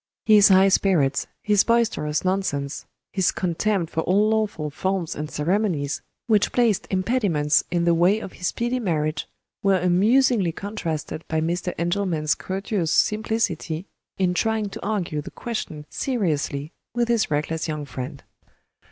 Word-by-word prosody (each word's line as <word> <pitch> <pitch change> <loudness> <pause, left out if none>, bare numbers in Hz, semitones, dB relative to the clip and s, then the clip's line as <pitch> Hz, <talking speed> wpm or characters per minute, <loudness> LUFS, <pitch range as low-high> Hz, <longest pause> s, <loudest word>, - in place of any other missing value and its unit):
His 210 -2 +7
high 190 0 +6
spirits, 155 -8 +2 0.2
his 210 -2 +4
boisterous 225 -10 +1
nonsense, 155 -7 -1 0.3
his 190 -3 +2
contempt 180 0 -1
for 160 - +1
all 200 +6 +2
lawful 210 -9 -1
forms 185 +2 -2
and 150 0 -5
ceremonies 160 -3 -1 0.2
which 215 -3 +2
placed 225 -5 +2
impediments 185 -7 +2
in 175 -1 0
the 170 - +4
way 175 +5 +4
of 195 - -8
his 180 - -3
speedy 240 +2 -1
marriage, 155 -7 -1 0.3
were 195 -1 +3
amusingly 195 +2 +3
contrasted 165 -6 -4
by 160 - 0
Mr. 175 +3 -2
Engelman's 170 -3 0
courteous 190 -3 -2
simplicity 210 -6 0 0.3
in 185 -2 +1
trying 220 +1 0
to - - -9
argue 185 -8 -2
the - - -8
question 160 -10 -5
seriously 155 - -2 0.2
with 240 -1 +1
his 235 -3 +1
reckless 155 +2 -1
young 150 -2 -3
friend. 130 +2 -7
185 Hz, 140 wpm, -23 LUFS, 155-210 Hz, 0.3 s, His